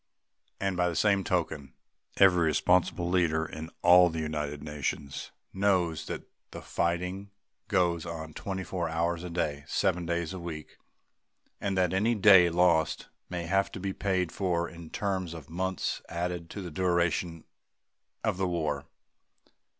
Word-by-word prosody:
And, 95 -1 -1
by 90 0 +2
the 85 - -4
same 100 +4 +3
token, 75 -5 -2 0.4
every 90 -3 +6
responsible 85 +3 +2
leader 85 -3 +2
in 80 +1 -7
all 90 0 +8
the 80 - -5
United 75 -2 -3
Nations 70 -1 -4 0.2
knows 95 -5 +1
that - - -5 0.3
the - - -9
fighting 90 +4 -2 0.4
goes 85 -4 +1
on 80 -2 -6
twenty 95 +2 -4
four 90 -3 -3
hours 85 +1 -1
a 90 - -5
day, 75 -4 -2
seven 90 -2 0
days 85 +1 -1
a 95 - -5
week, 80 -3 -7 0.8
and 100 -2 -1
that 90 -1 +2
any 110 +5 +2
day 95 -4 +7
lost 85 -2 +2 0.2
may 90 -2 -3
have 95 +4 +1
to - - -5
be 95 0 -3
paid 95 -4 0
for 85 -3 0
in 85 -2 -11
terms 95 -4 -2
of 80 -1 -11
months 95 +1 -2
added 85 -1 -3
to 100 - -6
the 90 - -6
duration 85 -1 0 0.8
of - - 0
the 95 0 0
war. 80 -4 -2
85 Hz, 150 wpm, -29 LUFS, 80-95 Hz, 0.8 s, all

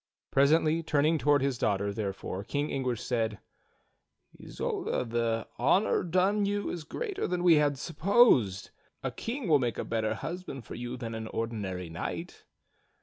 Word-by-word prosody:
Presently 155 +3 +4
turn 150 -3 +1
ing 160 +1 +3
toward 145 -2 +3
his 135 -3 0
daughter, 100 0 0
therefore. 100 -2 -4
King 145 +7 -2
Anguish 125 -3 -2
said: 115 -4 -1 1.1
"Isolda, - - -2
the 115 -1 -1
honor 180 - +3
done 185 +4 +2
you 205 0 -1
is 170 -3 -5
greater 400 - -3
than 180 -1 -1
we 170 -3 +7
had 145 -2 +2
supposed. 155 - +3 0.3
A - - -1
king 240 0 -4
will 150 -3 +5
make 120 -3 -1
a - - -3
better 110 -1 -1
husband 160 -5 -6
for - - -8
you 120 +1 -5
than 115 -2 -5
an 110 0 -5
ordinary 105 -6 -3
knight." 80 0 -6
135 Hz, 155 wpm, -29 LUFS, 115-165 Hz, 1.1 s, we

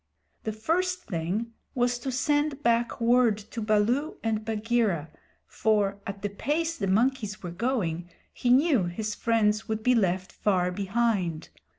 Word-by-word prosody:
The 220 - 0
first 360 +11 -1
thing 190 +7 -3 0.2
was 245 -1 +1
to 265 +2 -3
send 290 +2 0
back 235 -1 +1
word 235 -2 +4
to 215 +2 -7
Baloo 220 +8 +1
and 220 -1 0
Bagheera, 215 -7 0 0.3
for, 205 -2 +1
at 200 0 -6
the 205 - 0
pace 315 +11 -1
the 195 - -2
monkeys 215 0 +1
were 175 - -4
going, 175 -5 -1 0.2
he 245 - -1
knew 260 - +4
his 210 +5 -3
friends 215 -1 +1
would 220 -1 -2
be 250 - +4
left 185 -4 +1
far 180 -3 +1
behind. 195 -4 -1
220 Hz, 150 wpm, -27 LUFS, 200-245 Hz, 0.3 s, word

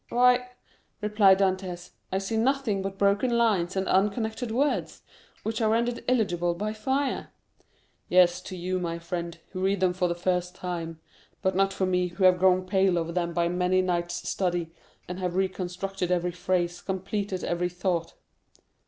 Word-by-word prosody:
"Why," 250 +1 +4 0.5
replied 210 -2 +5
Dantès, 185 -2 -1 0.2
"I 190 - +1
see 195 +3 -2
nothing 230 -3 +1
but 195 0 -4
broken 205 +5 +2
lines 195 -6 +2
and 190 0 -1
unconnected 220 +4 +1
words, 275 +6 -1 0.4
which 220 +1 -2
are 220 - +3
rendered 235 +2 0
illegible 175 -8 +1
by 210 +4 -2
fire." 265 +6 -1 0.8
"Yes, 180 0 +5
to 185 - -6
you, 185 +1 -2
my 170 -1 -3
friend, 170 0 -5
who 185 - -5
read 195 +1 +1
them 185 -1 +2
for 180 0 0
the 170 - -1
first 180 0 -1
time; 170 -3 -5 0.4
but 190 0 +1
not 195 +1 +3
for 190 - -1
me, 180 -1 +1
who 180 +2 -4
have 185 -1 +6
grown 185 0 +4
pale 190 -1 +2
over 165 0 -1
them 170 0 -1
by 170 0 +1
many 180 +1 +2
nights' 175 -1 -2
study, 175 -3 -1 0.4
and 180 +1 -5
have 180 -1 -2
reconstructed 185 0 -2
every 180 0 +1
phrase, 175 0 -1
completed 190 0 -3
every 175 +1 0
thought." 180 -1 -2
185 Hz, 165 wpm, -27 LUFS, 175-200 Hz, 0.8 s, have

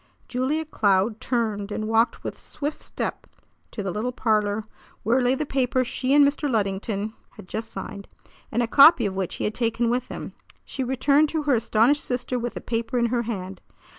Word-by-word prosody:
Julia 265 +6 -1
Cloud 210 -5 +1
turned 215 -4 -1
and 215 +1 -3
walked 225 +2 +2
with - - -6
swift 295 +1 -5
step - - -4 0.4
to 205 - -5
the 195 - -2
little 220 +6 -2
parlor 215 -3 +1 0.4
where 240 +5 +3
lay 250 +1 +3
the 305 - -2
paper 255 -2 +1
she 255 +2 -2
and 290 -1 +7
Mr. 290 +1 -1
Luddington 205 -1 -1 0.2
had - - -11
just 225 +4 -5
signed, 200 +1 -7 0.4
and 240 +2 +1
a - - -1
copy 275 -1 +7
of 195 - -1
which 190 -2 -3
he - - -4
had 210 - 0
taken 230 0 0
with 250 +1 -1
him. - - -7 0.3
She 265 - -4
returned 280 +4 +3
to 315 -1 -2
her 290 -2 +2
astonished 235 +4 +3
sister 250 0 -2
with 240 0 -4
the - - -5
paper 230 +1 -2
in 235 - +3
her 240 - +2
hand. 190 -5 -5
235 Hz, 195 wpm, -24 LUFS, 210-260 Hz, 0.4 s, and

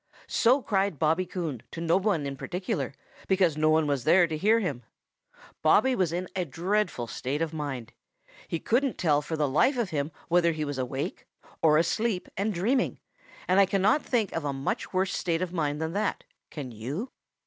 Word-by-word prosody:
|SO 255 +3 +3
cried 195 -5 0
Bobby 160 +5 +1
Coon 165 - -4
to - - -8
no 165 0 +2
one 190 -6 +1
in 140 0 -4
particular, 150 -5 -3 0.3
because 185 -5 +3
no 155 +1 +2
one 155 0 +4
was 140 -4 0
there 175 +5 +5
to 160 -2 -3
hear 215 +8 +3
him. 145 - -2 0.8
Bobby 215 +11 +4
was 180 -6 +1
in 180 +2 -2
a 185 - 0
dreadful 175 - -1
state 130 +5 -3
of 165 -1 -2
mind. 140 -7 -5 0.5
He 165 - -2
couldn't 255 - +1
tell 150 -4 +2
for 160 +2 -4
the 150 -1 +2
life 200 - +3
of 230 -6 -1
him 145 0 -1 0.2
whether 170 -1 +3
he 155 -1 -2
was 145 -2 -4
awake, 130 +2 -4 0.3
or 155 -1 +5
asleep 200 +4 0
and 205 +3 0
dreaming, 220 +8 0 0.5
and 185 +2 +4
I 195 - +6
cannot 200 +10 +3
think 225 -6 0
of 165 - -3
a 145 -1 -1
much 135 0 -3
worse 190 0 0
state 170 -1 0
of 180 -1 -5
mind 150 -4 -1
than 160 +1 -2
that, 205 +1 -1 0.3
can 140 -5 -6
you? 140 - -5
170 Hz, 190 wpm, -28 LUFS, 150-195 Hz, 0.8 s, I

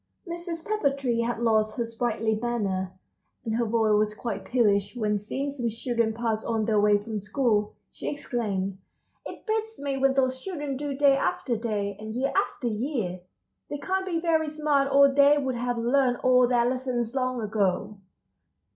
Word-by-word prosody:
Mrs. 340 -1 -5
Pepper 430 -9 +2
Tree 260 -4 -1
had 235 +1 -1
lost 220 -1 +2
her 235 - 0
sprightly 225 -1 -1
manner, 210 -5 -1 0.5
and 225 0 -1
her 235 - +1
voice 220 -1 +2
was 210 0 +2
quite 205 -5 -4
peevish 205 -3 +2
when, 210 -3 0
seeing 265 +8 -3
some 245 -4 -2
children 230 0 -1
pass 220 -1 -2
on 225 -2 0
their 215 -2 +2
way 205 0 +5
from 210 +1 -4
school, 210 0 0 0.2
she - - -5
exclaimed: 200 -9 -3 0.5
"It - - -10
beats 445 0 -2
me 280 -1 -2
what 270 0 +3
those 260 -1 +1
children 295 -7 -4
do 285 +1 -3
day 280 -1 +5
after 260 -2 -1
day, 210 -3 -2
and 215 +1 -6
year 265 +3 0
after 390 -9 0
year! 220 -5 -2 0.5
They 290 - -3
can't 380 +5 -1
be 340 -3 0
very 320 -2 +1
smart 295 -2 +1
or 280 +1 +7
they 280 +1 +5
would 265 -3 -1
have 245 0 -2
learned 245 +1 +2
all 250 -1 +5
their 240 -1 +3
lessons 250 -2 -2
long 255 -2 -1
ago." 205 -1 -1
240 Hz, 175 wpm, -26 LUFS, 215-275 Hz, 0.5 s, or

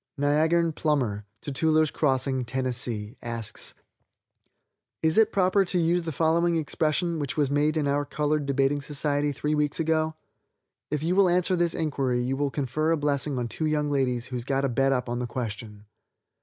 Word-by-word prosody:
Niagarn 160 +4 +2
Plummer, 125 -11 -1 0.2
Tutewler's 155 +2 +2
Crossing, 130 -2 +1
Tenn., 130 +2 -3 0.6
asks: 115 -2 -4 1.3
"Is 160 0 +3
it 220 0 +4
proper 195 +1 +3
to 180 - -1
use 175 +1 +2
the 165 -1 -4
following 165 +3 +2
expression, 160 +2 0
which 145 0 -3
was 145 -2 +1
made 150 +2 +2
in 150 -2 +1
our 145 +1 +1
colored 150 0 -1
debating 140 +1 +1
society 145 +1 -1
three 150 +2 -2
weeks 150 0 +1
ago? 160 0 +1 0.7
If 150 0 -2
you 175 +3 +1
will 195 -2 +5
answer 180 +1 +2
this 170 -1 +1
inquiry 135 -5 0
you 130 +2 -1
will 140 +1 0
confer 145 +3 -1
a 165 - +3
blessing 145 -1 0
on 120 -1 -1
two 155 +8 -3
young 150 -1 0
ladies 125 -4 0
who's 125 -2 -5
got 135 +2 0
a - - 0
bet 135 +3 +2
up 125 -2 0
on 120 0 -2
the 125 - -2
question. 110 -4 -6
145 Hz, 175 wpm, -26 LUFS, 130-160 Hz, 1.3 s, will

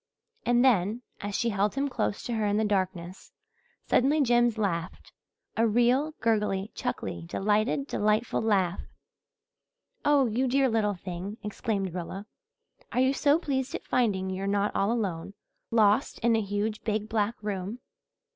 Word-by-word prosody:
And 245 +1 +4
then, 220 0 +2 0.2
as 205 0 -4
she 235 - +1
held 205 +1 0
him 275 +1 0
close 225 -6 -2
to 240 - -3
her 220 -2 0
in 205 0 +1
the 220 - +2
darkness, 185 -3 -2 0.5
suddenly 285 +5 +3
Jims 240 -4 +3
laughed 180 -5 -3 0.4
a 230 +1 +3
real, 245 +7 +2
gurgly, 210 -3 0
chuckly, 85 -1 -4
delighted, 215 - +1
delightful 215 -2 0
laugh. 195 -5 +1 1.2
"Oh, 290 -2 +4
you 245 +3 0
dear 265 +1 +3
little 215 -3 +1
thing!" 185 +3 -6
exclaimed 205 -3 -2
Rilla. 185 +3 -5 0.7
"Are - - 0
you 260 +1 +4
so 285 +2 +3
pleased 270 -5 -2
at - - -6
finding 195 -6 +1
you're 190 +1 -3
not 200 +1 0
all 200 +3 +2
alone, 195 -5 -3 0.3
lost 220 +2 +3
in 230 0 +3
a 220 - +2
huge, 205 +2 -2
big, 215 -1 -1
black 220 +1 0
room?" 200 +1 -3
215 Hz, 150 wpm, -28 LUFS, 195-240 Hz, 1.2 s, And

